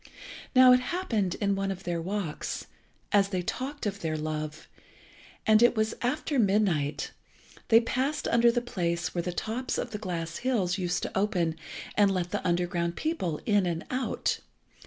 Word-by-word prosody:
Now 255 0 +9
it 250 - +6
happened 245 - -1
in 200 -1 0
one 195 0 -1
of 190 0 -4
their 175 -2 -2
walks, 185 -3 -3 0.5
as 200 -1 +4
they 185 -2 -1
talked 270 +8 -4
of 200 -1 -2
their 160 -3 -2
love, 155 0 -4 0.8
and 220 0 +5
it 240 +1 +5
was 220 0 +1
after 270 +2 0
midnight, 190 -9 +1 0.6
they 225 0 +7
passed 265 +5 -1
under 235 0 +5
the 240 0 0
place 175 -7 -2
where 175 - 0
the 180 - -3
tops 225 +8 -2
of - - -3
the 210 - -4
glass 170 -4 -4
hills 205 -7 0
used 180 -1 -1
to - - -4
open 180 -5 +1 0.4
and 205 -1 +5
let 180 -2 -1
the - - -2
underground 175 -1 0
people 190 - -2
in 205 -4 +3
and 165 -1 -2
out. 255 0 -1
195 Hz, 170 wpm, -28 LUFS, 175-235 Hz, 0.8 s, Now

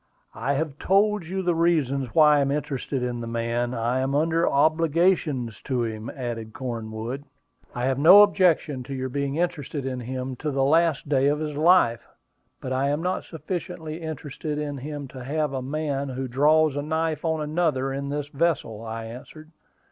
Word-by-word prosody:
"I 130 +5 -1
have 150 0 -3
told 200 -2 +2
you 190 +2 -3
the 175 -1 +2
reason 150 -6 +1
why 150 -2 +6
I - - +3
am 140 -1 +1
interested 140 -2 -2
in 120 -1 -3
the 115 - -5
man; 115 +1 -1
I 120 +3 0
am 135 +1 0
under 165 +3 +2
obligations 155 - +1
to 125 -3 -1
him," 110 0 -4
added 115 -4 -5
Cornwood. 115 +1 -5 0.5
"I 120 0 -1
have 135 0 0
no 185 +8 +9
objection 175 -9 +2
to 135 +1 -5
your 130 0 -3
being 140 +1 -2
interested 150 -4 -2
in 130 -1 -3
him 130 +1 -4
to 155 - -3
the 135 -1 0
last 160 +1 +2
day 140 -1 +2
of 145 +1 +2
his 150 -1 -4
life; 155 -7 +4 0.5
but 130 - -3
I 135 +2 +1
am 150 +3 -1
not 185 +1 -1
sufficiently 170 -1 -6
interested 155 -1 -5
in 145 -2 -3
him 145 +1 -6
to 130 -1 -9
have 150 +2 -1
a 130 - -2
man 140 0 -2
who 130 0 -4
draws 150 +4 +3
a 145 - -1
knife 160 0 -1
on 160 -1 0
another 150 -4 0
in 140 +1 -4
this 145 0 -3
vessel," 145 -8 -1
I 115 0 -5
answered. 150 +7 -11
140 Hz, 185 wpm, -25 LUFS, 130-160 Hz, 0.5 s, no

